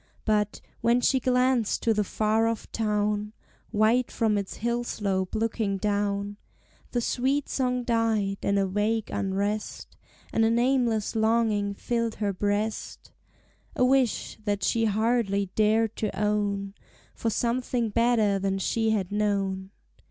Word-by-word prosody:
But, 210 -1 0 0.2
when 235 +1 +3
she 265 +2 +2
glanced 250 -2 +1
to 225 - +3
the 210 -1 +1
far 215 +3 +1
off 230 -1 -3
town, 210 -1 -1 0.4
White 225 +3 +2
from 220 -2 +1
its 200 -2 -3
hill 235 +2 -1
slope 195 -5 -2
looking 220 -2 -1
down, 205 0 -1 0.5
The 240 - -1
sweet 265 +4 0
song 250 -2 -1
died, 225 -4 0
and 200 - +1
a 195 - +2
vague 210 +3 -1
unrest 200 +2 -3 0.4
And 225 - +3
a 225 - +4
nameless 235 -2 +1
longing 220 -2 +1
filled 230 +1 -2
her 205 -2 -1
breast, 205 +3 -2 0.6
A 250 - +3
wish, 255 -3 +1
that 205 -2 -1
she 225 +4 +2
hardly 215 -3 +1
dared 220 +1 +2
to 205 -3 -3
own, 205 -1 0 0.4
For 230 - -2
something 240 0 0
better 220 -3 +2
than 195 0 -1
she 225 +3 0
had 205 -3 0
known. 195 -2 -1
215 Hz, 135 wpm, -27 LUFS, 205-230 Hz, 0.6 s, a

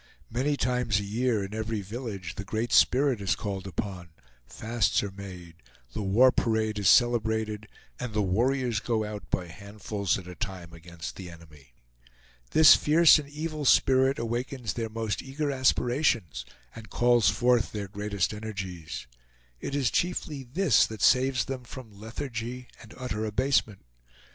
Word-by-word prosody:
Many 140 +5 0
times 125 -5 0
a - - -4
year, 110 +1 0
in 95 - -9
every 110 -1 -3
village, 100 -4 -6
the 105 - -6
Great 110 +4 -3
Spirit 130 -4 +4
is 100 - +1
called 100 -2 -5
upon, 95 -1 -5 0.4
fasts 115 -1 0
are 100 - -4
made, 90 -4 -10 0.4
the - - -3
war 110 +7 +5
parade 110 -3 0
is 100 -4 +3
celebrated, 110 -2 +2 0.3
and 125 -2 -4
the 105 -1 0
warriors 120 +4 +1
go 110 -1 -1
out 105 -5 -8
by 90 - -1
handfuls 100 +2 -3
at 90 -2 -10
a 90 - -8
time 90 -4 -6
against 85 0 -9
the 95 -2 -8
enemy. 75 -7 -16 0.7
This 155 -1 +8
fierce 160 +1 +6
and 145 -2 -8
evil 155 +1 -5
spirit 130 0 +4
awakens 120 0 -3
their 115 -2 -3
most 110 -1 -3
eager 140 +2 -3
aspirations, 120 - +1 0.3
and 110 -1 -11
calls 120 -1 +3
forth 120 -2 +2
their 105 -2 -5
greatest 100 -1 -2
energies. 95 -6 -6 0.5
It 140 - -4
is 135 -4 +1
chiefly 165 -5 -1
this 160 +10 +3
that 110 -1 -6
saves 130 0 +3
them 130 -2 -5
from 120 -2 -11
lethargy 120 +2 -6
and 110 - -14
utter 120 -4 -4
abasement. 110 -1 0
110 Hz, 155 wpm, -27 LUFS, 100-125 Hz, 0.7 s, This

